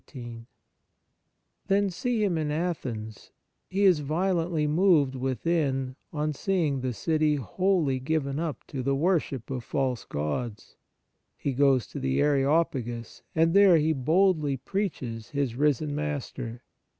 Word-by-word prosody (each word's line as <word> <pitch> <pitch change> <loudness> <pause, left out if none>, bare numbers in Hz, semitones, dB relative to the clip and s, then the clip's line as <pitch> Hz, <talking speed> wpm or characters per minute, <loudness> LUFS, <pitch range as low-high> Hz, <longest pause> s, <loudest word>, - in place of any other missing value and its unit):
I 120 -2 -8 1.2
Then 200 0 +2
see 230 +4 -1
him 190 -4 +1
in 155 -2 -1
Athens: 130 -10 -4 0.4
he 195 +2 0
is 180 -5 +5
violently 165 +1 0
moved 155 -3 +3
within 135 0 -1 0.2
on 150 -1 -1
seeing 155 -5 0
the 130 0 -1
city 155 +6 +1
wholly 145 - 0
given 140 0 -1
up 160 -6 -4
to 135 - -4
the 135 +2 +1
worship 145 -6 0
of 125 -3 -3
false 130 -3 -1
gods; 105 - -4 0.6
he 140 - -2
goes 135 -2 +3
to - - -7
the 65 0 0
Areo 145 +3 +4
pagus, 120 -3 -6
and 165 +1 +3
there 195 -3 +7
he 160 +1 +2
boldly 155 0 +2
preaches 125 - -4
his 140 -4 -1
risen 145 +1 +1
Master. 135 -5 -4
145 Hz, 135 wpm, -27 LUFS, 130-165 Hz, 1.2 s, there